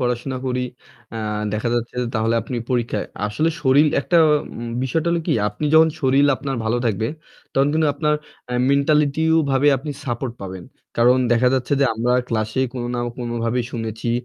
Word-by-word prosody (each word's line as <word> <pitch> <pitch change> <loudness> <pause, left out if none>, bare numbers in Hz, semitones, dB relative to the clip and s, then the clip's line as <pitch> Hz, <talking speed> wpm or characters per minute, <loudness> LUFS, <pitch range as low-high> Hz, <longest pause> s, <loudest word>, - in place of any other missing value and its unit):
পড়াশোনা 125 +1 -1
করি, 125 0 -1 0.5
আ - - -3 0.3
দেখা 110 +3 -1
যাচ্ছে 120 0 -2
যে - - -2
তাহলে 110 +1 +1
আপনি 125 - -5
পরীক্ষায় 120 -4 -1 0.2
আসলে 155 +10 0
শরীর 140 +2 +5
একটা 170 +4 +2 0.4
উম 120 0 -5
বিষয়টা 155 +6 0
হলো 170 -1 +1
কি - - +2 0.2
আপনি 105 +8 -6
যখন 160 0 +7
শরীর 135 +1 +3
আপনার 135 -1 -4
ভালো 110 +2 +1
থাকবে, 110 0 0 0.5
তখন 135 +1 +3
কিন্তু 160 0 +2
আপনার 150 +1 +1 0.4
এ - - -1 0.2
মেন্টালিটিও 150 +3 +3
ভাবে 135 +2 +3
আপনি 140 +4 -6
সাপোর্ট 120 -1 -3
পাবেন। 95 -2 -7 0.3
কারণ 125 +2 +5
দেখা 120 +2 +4
যাচ্ছে 130 +1 -1
যে 140 - +5
আমরা 120 +2 0 0.2
ক্লাস 110 -1 -1
এ - - +3
কোনো 120 -1 -3
না 120 - -1 0.2
কোনো 120 -1 -4
ভাবেই 120 +1 0
শুনেছি, 115 0 -3
125 Hz, 180 wpm, -21 LUFS, 115-140 Hz, 0.5 s, যখন